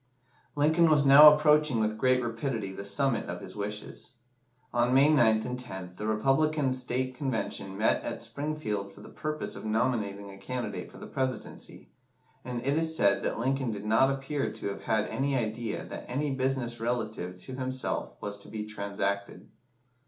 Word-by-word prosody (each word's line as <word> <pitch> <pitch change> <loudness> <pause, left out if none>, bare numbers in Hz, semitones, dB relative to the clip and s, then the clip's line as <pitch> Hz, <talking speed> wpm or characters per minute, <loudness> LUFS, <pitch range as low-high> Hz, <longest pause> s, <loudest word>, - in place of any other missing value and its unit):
Lincoln 160 +3 +4
was 150 -2 +4
now 145 +2 +11
approaching 150 -3 +3
with 110 0 0
great 130 +2 +3
rapidity 115 -3 -3
the 95 - -7
summit 115 +5 0
of - - -5
his 95 -2 -10
wishes. 105 +4 -5 0.6
On 120 +1 +2
May 140 +3 +6
9th 110 -7 +4
and 125 0 -4
10th 95 -7 -8
the 105 - -4
Republican 135 +5 +2
State 130 0 -1
Convention 115 -7 -3
met 110 - +2
at - - -4
Springfield 140 -10 -3
for 100 - -15
the - - -11
purpose 155 0 -4
of - - -8
nominating 110 -3 -1
a 95 - -12
candidate 125 +2 -5
for - - -13
the - - -9
Presidency, 130 -4 -5 0.5
and 125 -1 -5
it 140 +1 +2
is 160 0 0
said 100 -1 +3
that - - -2
Lincoln 130 +2 0
did 105 -1 -5
not 115 +5 +4
appear 135 +1 -2
to - - -5
have 100 - -6
had 110 -1 +1
any 135 +4 -1
idea 110 -1 -3
that - - -8
any 140 +3 -1
business 130 -3 -1
relative 110 -6 -3
to 130 +8 -9
himself 130 0 -3
was 100 0 -5
to 100 - -14
be 105 0 -5
transacted. 100 -1 -3
120 Hz, 175 wpm, -29 LUFS, 105-135 Hz, 0.6 s, now